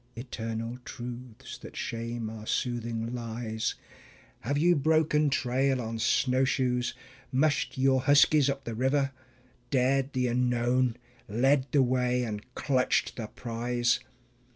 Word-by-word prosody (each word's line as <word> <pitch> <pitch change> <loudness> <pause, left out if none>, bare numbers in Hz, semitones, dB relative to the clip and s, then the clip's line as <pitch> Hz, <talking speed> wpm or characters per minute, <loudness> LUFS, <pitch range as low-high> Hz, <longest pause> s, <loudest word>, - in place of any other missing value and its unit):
(Eternal 115 -1 -5
truths 120 -1 -8
that - - -11
shame 115 0 -3
our 110 0 -8
soothing 115 -1 -2
lies). 115 -2 -3 0.6
Have 140 +5 -1
you 175 +4 +4
broken 155 0 +3
trail 135 0 +1
on 115 -1 -4
snowshoes? 125 0 +1 0.4
mushed 140 +2 +1
your 130 0 +3
huskies 145 +1 +5
up 140 0 -3
the 115 - -5
river, 135 +4 +1 0.6
Dared 135 +1 +2
the 130 -1 +1
unknown, 125 0 +1 0.3
led 130 +5 +2
the 140 -2 +4
way, 125 0 +1
and 105 -2 -4
clutched 130 -3 +1
the 110 -3 -5
prize? 120 +1 -1
125 Hz, 120 wpm, -29 LUFS, 115-135 Hz, 0.6 s, huskies